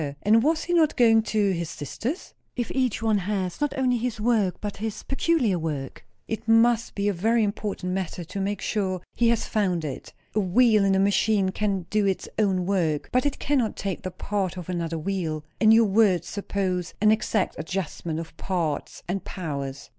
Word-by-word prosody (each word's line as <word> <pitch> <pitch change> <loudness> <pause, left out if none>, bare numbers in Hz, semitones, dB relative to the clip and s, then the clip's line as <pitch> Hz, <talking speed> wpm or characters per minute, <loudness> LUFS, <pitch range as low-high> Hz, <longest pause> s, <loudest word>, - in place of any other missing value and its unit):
And 220 +3 +5
was 315 +5 +1
he 350 - -2
not 320 -3 +3
going 225 -3 +5
to 210 -2 +1
his 170 -3 -2
sister's? 225 - -5 0.2
"If 240 -2 -2
each 255 -4 0
one 215 -2 +3
has, 190 0 -3
not 295 -1 0
only 255 -2 +2
his 230 -1 -3
work 210 -5 +1
but 205 -1 -5
his 220 0 -4
peculiar 270 - +1
work, 150 -4 -4 0.2
it 220 0 -4
must 230 0 +3
be 200 0 0
a 205 - +2
very 225 +6 +2
important 200 -3 -3
matter 185 -2 -3
to 195 +4 -5
make 200 0 -2
sure 190 -4 -1
he 235 -1 +2
has 230 -1 +1
found 185 -6 0
it. 140 - -6 0.2
A 215 - +1
wheel 215 +2 +4
in 195 -1 +3
a - - +3
machine 200 0 +2
can 195 -2 -1
do 210 -1 +2
its 190 - -1
own 190 -4 +2
work, 170 -6 0
but 255 +3 +2
it 285 - -3
cannot 260 -6 0
take 195 -3 -3
the 185 - -4
part 190 -1 -3
of 180 -1 -7
another 170 -2 -2
wheel. 160 -3 -3
And 220 -1 +6
your 225 +1 +6
words 195 -4 +3
suppose 190 -3 -2
an 215 +1 +5
exact 215 -2 +1
adjustment 165 -1 -3
of 165 - -8
parts 170 -6 -3
and 190 +2 -2
powers." 140 -7 -5
200 Hz, 190 wpm, -25 LUFS, 180-225 Hz, 0.2 s, And